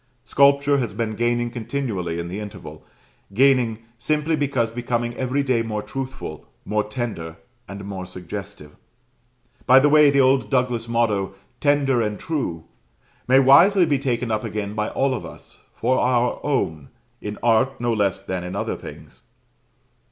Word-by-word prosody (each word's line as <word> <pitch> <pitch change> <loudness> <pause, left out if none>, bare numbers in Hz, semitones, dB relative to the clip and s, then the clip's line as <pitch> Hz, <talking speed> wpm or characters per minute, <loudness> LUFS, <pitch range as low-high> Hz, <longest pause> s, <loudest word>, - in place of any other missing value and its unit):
Sculpture 140 0 +3
has 115 -6 -3
been 110 -1 -2
gaining 120 +1 0
continually 110 -8 -3
in 85 0 -4
the 95 +4 -5
interval; 105 -2 -9 0.5
gaining, 125 -3 +3 0.2
simply 155 +4 0
because 135 -6 0
becoming 120 0 -2
every 130 +3 -1
day 130 -4 +1
more 105 -2 -3
truthful, 135 -1 -7 0.2
more 105 0 0
tender, 105 -8 -5 0.3
and 100 0 -8
more 95 -2 -6
suggestive. 90 -3 -8 0.9
By 130 - +7
the 145 +2 +4
way, 150 0 +6
the 140 0 +2
old 130 -4 +3
Douglas 125 -2 0
motto, 105 -5 0 0.2
"Tender 140 -4 +2
and 105 -2 -2
true," 130 - -3 0.6
may 130 +2 +5
wisely 170 +8 +6
be 145 -4 +1
taken 125 -3 -1
up 110 0 -1
again 105 -1 -4
by 105 0 -2
all 135 0 0
of 120 - -4
us, - - -12
for 130 - +1
our 125 -1 +1
own, 80 - -1 0.3
in 105 0 -5
art 125 +3 +2
no 120 -1 0
less 100 -3 0
than 95 -2 -3
in 90 +1 -6
other - - -2
things. - - -12
120 Hz, 155 wpm, -22 LUFS, 105-135 Hz, 0.9 s, By